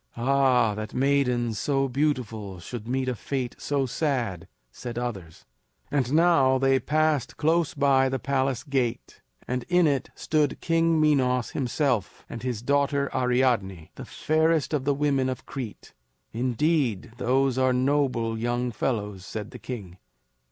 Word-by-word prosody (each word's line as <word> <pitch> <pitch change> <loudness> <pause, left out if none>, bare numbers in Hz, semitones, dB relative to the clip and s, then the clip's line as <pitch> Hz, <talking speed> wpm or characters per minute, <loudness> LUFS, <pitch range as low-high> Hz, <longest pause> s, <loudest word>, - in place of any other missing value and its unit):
"Ah, 130 -3 +3
that 110 0 -6
maidens 125 -5 +1
so 135 -1 +1
beautiful 120 -8 -2
should 115 +5 -7
meet 130 +1 -1
a 125 - 0
fate 125 +1 -4
so 140 -2 0
sad!" 120 - -2 0.2
said 120 - -7
others. 100 -10 -5 0.5
And 135 -4 0
now 150 -5 +4
they 135 0 +3
passed 155 -3 0
close 165 +1 +1
by 135 -1 +3
the 135 - -1
palace 130 0 -1
gate, 130 -5 -2 0.3
and 125 0 -1
in 180 -1 +4
it 140 -4 0
stood 150 -3 0
King 165 -1 +2
Minos 130 -5 +2
himself, 125 - -1
and 115 - -7
his 125 -3 -3
daughter 140 +1 +1
Ariadne, 120 -10 0
the - - -9
fairest 160 0 +1
of 140 -3 0
the 145 0 +2
women 140 -2 +1
of 130 - -5
Crete. 120 -7 -7 0.4
"Indeed, 125 - 0
those 130 +1 +1
are 130 0 +3
noble 125 -4 +1
young 120 +1 -1
fellows!" 105 -5 -2
said 105 +1 -6
the - - -10
king. 100 -8 -7
130 Hz, 145 wpm, -26 LUFS, 120-140 Hz, 0.5 s, now